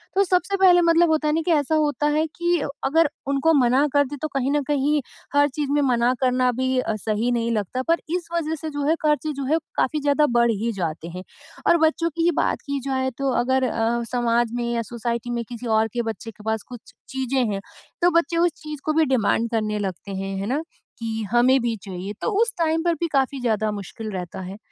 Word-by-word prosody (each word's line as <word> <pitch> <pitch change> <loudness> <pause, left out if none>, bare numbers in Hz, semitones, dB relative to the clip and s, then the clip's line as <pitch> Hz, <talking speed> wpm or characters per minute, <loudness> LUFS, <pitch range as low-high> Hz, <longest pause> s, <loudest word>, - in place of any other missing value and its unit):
तो 395 - +5
सबसे 365 +1 +1
पहले 360 -2 +6
मतलब 335 0 +4
होता 310 -1 +2
नहीं 320 +1 0
कि 345 - 0
ऐसा 300 0 +2
होता 295 -1 +1
है 310 - +2
कि 345 -1 +1 0.3
अगर 320 +2 +3 0.2
उनको 280 +4 +2
मना 260 +1 +4
कर 285 0 +4
दे 290 - -6
तो 310 - -1
कहीं 270 0 0
न 295 0 +2
कहीं 295 +1 +1 0.3
हर 285 0 +5
चीज़ 285 0 -3
में 290 0 +3
मना 245 -2 +2
करना 255 -1 +3
भी 260 +1 -1
अ, 220 -3 -1
सही 215 +3 -1
नहीं 235 -1 0
लगता 220 +4 -1
पर 335 +1 +3 0.2
इस 350 -2 -3
वजह 320 -1 -1
से 315 - -3
जो 290 -1 -3
है 320 - +4
खर्चे 305 0 +1
जो 275 0 -4
है 310 +4 +2 0.2
काफ़ी 300 +3 +1
ज़्यादा 290 +1 +3
बढ़ 235 -1 +4
ही 225 +2 -1
जाते 165 -3 -4
हैं। 180 +2 -7 0.4
और 340 - +6
बच्चों 335 +1 -1
की 330 - 0
ही 345 - +4
बात - - -1
की 280 -1 -2
जाए 260 -1 0
तो 275 -1 0
अगर 260 +1 +1
अ, 230 +1 0
समाज 240 -1 +1
में 240 - -1
या 230 - 0
सोसाइटी 235 0 -3
में 235 -1 -2
किसी 240 0 -7
और 220 0 +3
के 240 - 0
बच्चे 225 +2 -9
के 210 0 -16
पास 220 -1 -1
कुछ 245 -3 -12 0.2
चीज़ें 265 -1 0
हैं 195 - -3 0.4
तो 350 - +5
बच्चे 335 +1 -2
उस 345 0 +3
चीज़ 300 -2 -7
को 310 - +1
भी 320 0 +3
डिमांड 230 -3 +1
करने 215 -2 -1
लगते 195 0 -5
हैं, 195 0 -4
है 195 - -3
ना, 280 +7 -1 0.4
कि 225 -1 -3
हमें 255 +2 +4
भी 235 -1 -1
चाहिए। 190 +1 -6
तो - - 0
उस 470 +1 +2
टाइम 325 0 +1
पर 340 -1 +2
भी 335 +2 -2
काफ़ी 270 0 +1
ज़्यादा 215 -3 0
मुश्किल 210 +2 -6
रहता 180 -1 -5
है। 190 +2 -7
260 Hz, 230 wpm, -23 LUFS, 230-305 Hz, 0.4 s, पहले